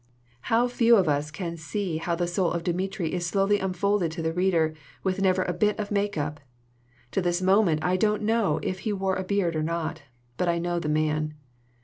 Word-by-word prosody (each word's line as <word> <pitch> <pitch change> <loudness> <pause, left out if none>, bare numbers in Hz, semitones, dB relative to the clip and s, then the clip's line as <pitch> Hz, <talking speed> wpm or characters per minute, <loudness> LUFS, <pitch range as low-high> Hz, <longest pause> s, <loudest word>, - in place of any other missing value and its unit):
"How 235 +2 +4
few 235 -1 +4
of 190 -6 +3
us 145 0 +1
can 170 +1 -5
see 170 +2 -3
how 170 +1 -1
the 175 +1 0
soul 175 0 0
of 170 -1 -2
Dmitri 180 -1 -2
is 175 -1 -1
slowly 195 +2 +2
unfolded 190 -1 0
to 165 -1 -4
the 160 0 0
reader 170 -3 +2 0.3
with 190 0 0
never 185 -1 +3
a 180 - -2
bit 210 +2 +1
of 205 -1 -3
make 205 -2 0
up! 150 0 -2 0.7
To 195 - 0
this 175 0 +1
moment, 185 -4 +3
I 180 +1 +2
don't 210 +2 +1
know 210 -8 +2
if 185 - -2
he 210 +2 -2
wore 190 -1 0
a 190 - -2
beard 185 -3 0
or 155 - 0
not; 165 0 -2 0.4
but 180 - +1
I 170 - +2
know 175 0 -1
the 150 - -3
man. 155 0 0
180 Hz, 215 wpm, -26 LUFS, 165-200 Hz, 0.7 s, How